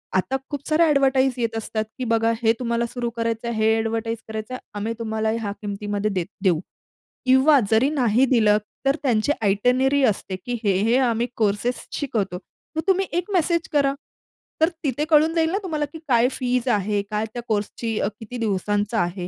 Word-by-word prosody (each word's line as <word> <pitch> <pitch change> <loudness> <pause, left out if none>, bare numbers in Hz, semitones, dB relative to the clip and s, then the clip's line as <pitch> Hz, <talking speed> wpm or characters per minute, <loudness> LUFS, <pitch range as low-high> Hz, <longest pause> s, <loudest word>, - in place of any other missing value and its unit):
आता 190 +8 +1
खूप 285 -1 -5
सारे 320 +1 +4
अ‍ॅडव्हर्टाइज 270 -4 +3
येत 230 -2 -1
असतात, 215 0 -2
की 255 - -3
बघा 230 0 +3
हे 225 -1 +4
तुम्हाला 235 -1 0
सुरू 240 0 -3
करायचंय 230 0 -2
हे 220 0 +3
अ‍ॅडव्हर्टाइज 225 +1 -1
करायचं 220 +3 -5
आहे. 255 - -4
आम्ही 210 +2 -3
तुम्हाला 220 -1 -1
ह्या 205 -2 -3
किमतीमध्ये 205 0 -2
दे 185 -3 -1 0.2
देऊ 180 -5 +3 0.7
किंवा 265 +3 +6
जरी 230 +5 +4
नाही 255 -4 +3
दिलं, 220 -5 +4 0.3
तर 275 - +3
त्यांची 240 +1 +2
आयटिनरी 250 +7 +2
असते 195 -3 -1
की 245 - -3
हे 195 -3 +2
हे 230 +3 +3
आम्ही 240 -2 +1
कोर्सेस 215 +3 0
शिकवतो. 215 - -2 0.4
मग 320 - 0
तुम्ही 385 0 +3
एक 360 +3 -2
मेसेज 335 -2 +1
करा. 280 -2 +2 0.7
तर 320 - +5
तिथे 290 +1 0
कळून 315 +1 +5
जाईल 325 -1 +2
ना 385 - +1
तुम्हाला 305 -5 -1
की 320 - -7
काय 240 -2 +4
फीज 250 -1 -1
आहे, 205 -2 +1
काय 210 +1 0
त्या 240 - -4
कोर्सची 220 +1 -2
अ, - - +1
किती 230 +2 -7
दिवसांचा 205 0 0
आहे 175 +1 -3
230 Hz, 180 wpm, -23 LUFS, 215-270 Hz, 0.7 s, किंवा